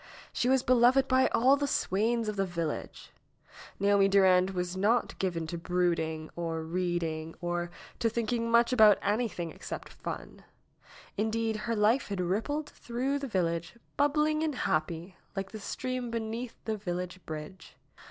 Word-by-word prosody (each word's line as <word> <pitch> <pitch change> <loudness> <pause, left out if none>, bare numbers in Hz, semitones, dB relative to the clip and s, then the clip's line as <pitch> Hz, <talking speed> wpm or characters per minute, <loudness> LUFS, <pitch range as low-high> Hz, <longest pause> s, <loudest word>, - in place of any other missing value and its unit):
She 245 - +1
was 265 -1 +3
beloved 255 +2 +5
by 260 0 +4
all 260 +4 +4
the 285 0 -1
swains 225 0 +1
of 210 - -2
the 195 - +1
village. 170 -4 -4 0.7
Naomi 200 0 +4
Durand 190 -2 +5
was 180 -1 -3
not 215 +6 +2
given 175 -4 -1
to 170 +1 -5
brooding, 165 -3 -1
or 165 -1 -3
reading, 165 -2 -2
or 175 0 -2 0.3
to 230 - +2
thinking 230 +1 -1
much 235 +2 +4
about 215 -4 +7
anything 205 -6 -1
except - - -7
fun. - - -7 0.7
Indeed, 220 +1 0
her 230 +2 -2
life 220 +5 +3
had 200 -2 -4
rippled 225 - -1
through 260 +4 -2
the 275 - -4
village, 170 -1 -1 0.2
bubbling 300 +2 +2
and 315 -3 0
happy, 165 0 -2 0.2
like 195 -1 -4
the 220 - -7
stream 255 +4 -3
beneath 230 +1 -4
the 220 -1 -1
village 180 -2 -4
bridge. 155 +4 -8
205 Hz, 150 wpm, -30 LUFS, 175-240 Hz, 0.7 s, about